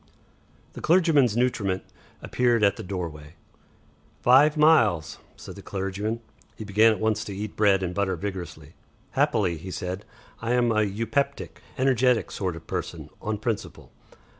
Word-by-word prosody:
The - - -9
clergyman's 155 - +3
nutriment 100 -7 0 0.4
appeared 120 -3 +1
in 100 - +5
the - - -7
doorway. 85 -5 -6 0.9
"Five 145 +5 +5
miles," 115 - +3 0.2
said - - -10
the - - -10
clergyman. 100 +4 -3 0.3
He - - -7
began 105 +2 +4
at 110 - -2
once 110 -1 0
to 100 - -6
eat 105 +1 -5
bread 100 -3 +3
and 90 -1 -2
butter 100 0 0
vigorously. 85 -6 -7 0.4
"Happily," 90 -5 +1
he 95 +4 -8
said, 95 +1 -5 0.4
"I 115 +2 -1
am 120 -1 +2
an 110 -2 +1
eupeptic, 115 +7 -2 0.2
energetic 130 -2 +2
sort 95 -4 -3
of 85 - -11
person - - -5
on 110 0 -2
principle. 110 0 -5
105 Hz, 145 wpm, -25 LUFS, 95-120 Hz, 0.9 s, in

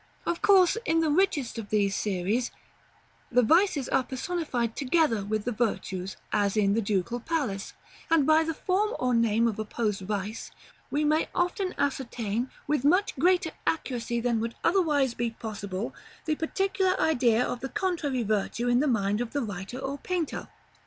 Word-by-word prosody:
Of 340 - -1
course, 385 0 +5
in 330 -8 +2
the 315 -2 +2
richest 300 -9 +1
of 210 -2 -7
these 200 -2 +1
series, 210 +5 0 0.8
the 250 0 +4
vices 320 - +3
are - - +2
personified 260 -4 -2
together 275 -6 +2
with 215 +1 -2
the 245 - 0
virtues, 195 -5 -2 0.2
as 200 0 +1
in 200 -1 +3
the 225 - +2
Ducal 210 +3 -1
Palace; 245 -9 -2 0.4
and 325 -4 +4
by 315 +2 +5
the 325 0 -3
form 415 +8 0
or 250 0 0
name 230 0 +3
of 220 -2 -2
opposed 210 -2 -2
vice, 205 +2 -4 0.4
we 295 +1 0
may 305 +1 +2
often 360 +1 0
ascertain, 245 -4 -1 0.2
with 295 -3 0
much 365 +8 +3
greater 350 +2 +3 0.2
accuracy 240 -6 -1
than 235 -1 +1
would 230 +1 -3
otherwise 295 -9 +2
be 240 0 -1
possible, 205 -2 -5 0.3
the 315 - +1
particular 380 +4 0
idea 245 -6 +3
of 245 - -3
the 270 - -5
contrary 330 - -1
virtue 215 +3 -1
in 245 0 +4
the 300 - +2
mind 210 -3 +1
of 245 - -4
the 285 -2 0
writer 205 +2 -6
or 270 +1 -4
painter. 350 -2 -3
245 Hz, 165 wpm, -27 LUFS, 220-320 Hz, 0.8 s, course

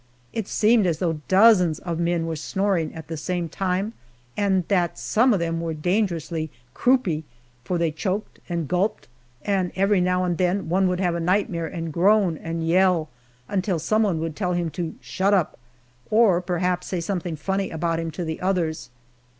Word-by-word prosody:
It 220 -3 -3
seemed 215 -2 +3
as 165 -3 0
though 165 -3 -1
dozens 190 -5 +5
of 170 -2 -4
men 170 -1 0
were 165 -1 -2
snoring 185 +1 -1
at 160 - -8
the 165 - -5
same 175 +2 -2
time, 190 +5 -2 0.4
and 190 -4 +1
that 175 -4 +1
some 245 +4 +2
of 205 - +2
them 165 0 -1
were 165 -1 -3
dangerously 170 -2 -1 0.2
"croupy," 220 - +2 0.4
for 180 - -1
they 170 -1 +1
choked 190 +6 -3
and 170 -3 -2
gulped, 185 +7 -1 0.4
and 190 -3 0
every 195 0 +3
now 180 0 +1
and 175 -1 -1
then 185 0 0
one 190 +2 +3
would 180 0 -1
have 175 -2 0
nightmare 175 -2 0
and 165 -2 -5
groan 190 0 +3
and 165 +1 -4
yell 175 -2 +3 0.4
until 190 -2 0
some 215 +7 +1
one 195 -7 +1
would 165 -2 -3
tell 180 -3 -1
him 175 -2 -1
to 165 +1 -4
"shut 200 +2 +1
up," 180 -9 -1 0.5
or 215 -5 +4
perhaps 180 0 -1
say 185 - -2
something 175 -1 -3
funny 195 +5 -2
about 165 0 -1
him 165 0 -3
to 175 +2 -5
the 160 0 -4
others. 175 -7 -1
180 Hz, 180 wpm, -24 LUFS, 165-195 Hz, 0.5 s, dozens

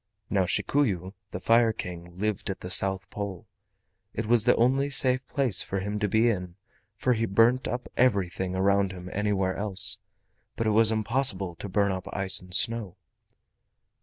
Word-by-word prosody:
Now 95 -2 +2
Shikuyu, 95 -4 0 0.2
the 90 - -6
Fire 115 +4 +4
King, 85 -3 -8
lived 105 0 -2
at 95 - -5
the 90 - -6
South 95 0 +1
Pole. 100 0 -6 0.7
It 115 - -2
was 115 0 +3
the 125 - +5
only 135 +4 +2
safe 130 -1 +1
place 135 -7 +1
for 95 - -3
him 105 +2 -3
to 105 - 0
be 110 +4 +3
in, 90 -6 -2 0.4
for 125 +4 +1
he 115 0 -1
burnt 115 +6 +3
up 125 0 -4
everything 95 -6 +1
around 100 0 +2
him 90 0 -9
anywhere 100 -2 0
else, 100 -2 +1 0.6
but 115 - -2
it 110 - +2
was 110 +1 +5
impossible 110 -4 +1
to 100 - -7
burn 100 +1 +1
up 95 0 -5
ice 95 -2 +1
and 90 0 -8
snow. 110 -4 -1
100 Hz, 170 wpm, -27 LUFS, 95-115 Hz, 0.7 s, the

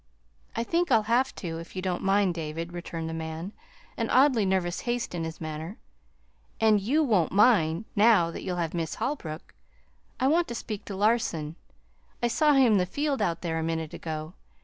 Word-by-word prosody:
"I 230 - 0
think 340 +8 0
I'll 220 - +5
have 240 +4 +1
to, 165 -3 -5
if 165 +2 -11
you 185 - -3
don't 180 -2 -1
mind, 195 -1 +2
David," 165 +1 -5
returned 170 -2 -5
the 160 - -4
man, 160 +3 -5 0.5
an - - -1
oddly 255 -6 +4
nervous 185 -2 0
haste 240 -3 -2
in 170 -2 -3
his 160 0 -6
manner. 160 +5 -6 0.8
"And 215 -2 +4
YOU 285 +10 +2
won't 205 - +2
mind, 195 -4 +4
now 205 -6 +5
that - - -7
you'll 180 -1 -3
have 165 -2 -2
Miss 165 -3 -2
Holbrook. 165 - -4 0.7
I 260 - +1
want 330 +5 +3
to 235 - -5
speak 215 -3 -6
to 200 - -6
Larson. 195 -7 0 0.7
I 240 - +3
saw 295 +6 +3
him 265 -4 +5
in 210 - +5
the 180 - 0
field 285 +6 -1
out 170 - 0
there 165 -2 -2
a - - -2
minute 160 0 -3
ago. 155 0 -5
185 Hz, 195 wpm, -27 LUFS, 165-235 Hz, 0.8 s, I'll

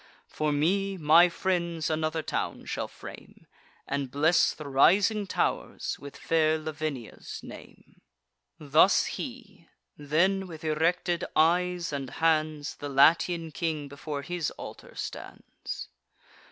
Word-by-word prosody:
For 155 -1 -2
me, 190 +7 +1
my 165 +2 +6
friends 170 -3 -1
another 155 0 -1
town - - -3
shall - - -3
frame, - - -12 0.4
And 140 -1 -2
bless 155 +6 +3
the 150 - -9
rising 200 +9 +4
tow'rs - - -2
with 140 0 -10
fair 160 -1 +2
Lavinia's 155 -6 -6
name." - - -13 0.6
Thus 155 +5 +4
he. 225 - -7 0.3
Then, 185 +7 +1
with 165 -2 -10
erected 170 +3 0
eyes 175 +1 +2
and 135 -2 -3
hands, 155 -2 0
The 145 - -6
Latian 165 +4 +3
king 155 -2 -2
before 140 0 -6
his 175 -2 -2
altar - - -10
stands. - - -7
160 Hz, 115 wpm, -28 LUFS, 150-175 Hz, 0.6 s, my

